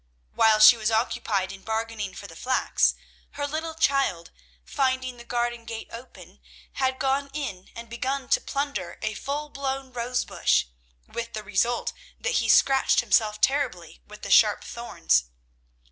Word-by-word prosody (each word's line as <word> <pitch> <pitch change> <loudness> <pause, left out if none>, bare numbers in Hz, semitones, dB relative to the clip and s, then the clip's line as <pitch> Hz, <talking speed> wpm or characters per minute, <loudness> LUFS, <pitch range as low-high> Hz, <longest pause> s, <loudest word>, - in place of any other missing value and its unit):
While 220 -1 +5
she 215 +3 +9
was 215 -1 0
occupied 220 -4 0
in 195 0 -10
bargaining 220 -2 -3
for 205 - -9
the 165 - -11
flax, 255 +9 +1 0.4
her 285 - -3
little 315 +2 -4
child, 275 - +1 0.3
finding 260 -2 -1
the 235 - -11
garden 240 -1 -2
gate 225 0 -7
open, 240 +3 -12 0.3
had 260 -1 0
gone 275 +1 0
in 200 -12 -5
and 235 0 -8
begun 260 +3 -3
to - - +3
plunder 280 0 -3
a 215 0 -1
full 290 +6 -4
blown 270 -2 -4
rose 245 +1 -1
bush, - - +2 0.4
with 235 0 -6
the 215 - -5
result 210 +5 0 0.3
that 475 0 0
he - - -2
scratched 270 -1 +4
himself 215 -2 +2
terribly 180 - 0
with - - -13
the - - -4
sharp - - +5
thorns. - - 0
240 Hz, 155 wpm, -26 LUFS, 215-270 Hz, 0.4 s, she